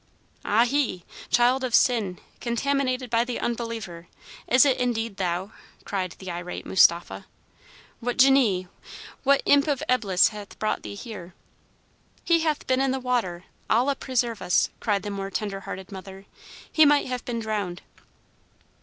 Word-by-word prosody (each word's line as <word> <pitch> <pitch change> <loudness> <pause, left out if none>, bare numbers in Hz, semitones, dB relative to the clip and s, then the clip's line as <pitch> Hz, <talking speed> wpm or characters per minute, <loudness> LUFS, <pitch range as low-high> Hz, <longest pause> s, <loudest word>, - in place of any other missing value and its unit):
"Ahi! 235 -4 +1 0.2
child 250 +2 +3
of 250 -2 +1
sin, 215 -8 +2 0.2
contaminated 255 0 -1
by 230 0 +3
the 245 0 -4
unbeliever, 225 -8 -4 0.4
is 255 +3 +6
it 270 -3 +3
indeed 230 -4 -1
thou?" 185 +2 -2 0.3
cried 185 -3 -3
the 190 -2 -7
irate 175 +1 -6
Mustapha. 170 - +3 0.7
"What 245 +1 -3
djinnee, 250 -9 +4 0.5
what 280 0 +3
imp 285 +1 +4
of 285 -3 0
Eblis 205 -8 +3
hath 210 -2 -10
brought 215 - -1
thee - - -7
here?" 200 -6 -9 0.9
"He 335 -1 +3
hath 310 -2 -1
been 260 0 +1
in 270 - +2
the 265 +1 -1
water, 235 -9 -1 0.3
Allah 250 +5 +3
preserve 240 -4 -2
us!" 180 - +2
cried 205 -3 0
the 205 - -4
more 195 -1 -4
tender 200 -1 -3
hearted 190 0 -8
mother. 195 0 -10 0.5
"He 315 - +5
might 290 -1 +5
have 250 -1 -4
been 235 -1 -3
drowned." 205 -5 -3
230 Hz, 145 wpm, -25 LUFS, 195-255 Hz, 0.9 s, is